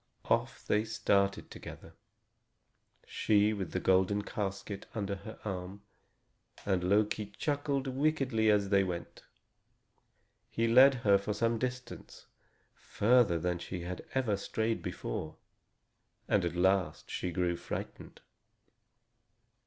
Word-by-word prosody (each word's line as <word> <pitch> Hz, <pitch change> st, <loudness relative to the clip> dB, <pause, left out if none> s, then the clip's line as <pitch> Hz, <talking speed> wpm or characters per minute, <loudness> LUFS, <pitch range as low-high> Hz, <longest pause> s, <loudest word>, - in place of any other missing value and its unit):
Off -, -, 0 dB
they 105 Hz, +1 st, +2 dB
started 105 Hz, -3 st, 0 dB
together, -, -, -10 dB, 1.1 s
she 105 Hz, 0 st, +2 dB
with 95 Hz, -4 st, -4 dB
the -, -, -1 dB
golden 95 Hz, +2 st, +2 dB
casket 100 Hz, 0 st, -5 dB
under 100 Hz, -2 st, -2 dB
her 110 Hz, +3 st, -10 dB
arm; 95 Hz, 0 st, -5 dB, 0.8 s
and 95 Hz, -3 st, +1 dB
Loki 105 Hz, +2 st, +1 dB
chuckled 145 Hz, -2 st, -1 dB
wickedly 135 Hz, -5 st, +1 dB
as 100 Hz, -2 st, +3 dB
they 100 Hz, -1 st, +4 dB
went. 85 Hz, -3 st, -5 dB, 1.3 s
He 115 Hz, 0 st, 0 dB
led 130 Hz, +4 st, +7 dB
her 100 Hz, -1 st, +6 dB
for 100 Hz, +1 st, -3 dB
some 115 Hz, +1 st, +1 dB
distance, 125 Hz, +1 st, -6 dB, 0.5 s
further 110 Hz, -5 st, +2 dB
than 90 Hz, +1 st, -1 dB
she 90 Hz, +1 st, -6 dB
had 90 Hz, +1 st, -6 dB
ever 120 Hz, -7 st, +1 dB
strayed 110 Hz, +3 st, -2 dB
before, 80 Hz, -, -5 dB, 0.9 s
and -, -, +2 dB
at 85 Hz, 0 st, -2 dB
last 90 Hz, -2 st, +1 dB
she 90 Hz, -, -2 dB
grew 85 Hz, 0 st, 0 dB
frightened. -, -, -7 dB
100 Hz, 115 wpm, -31 LUFS, 95-115 Hz, 1.3 s, led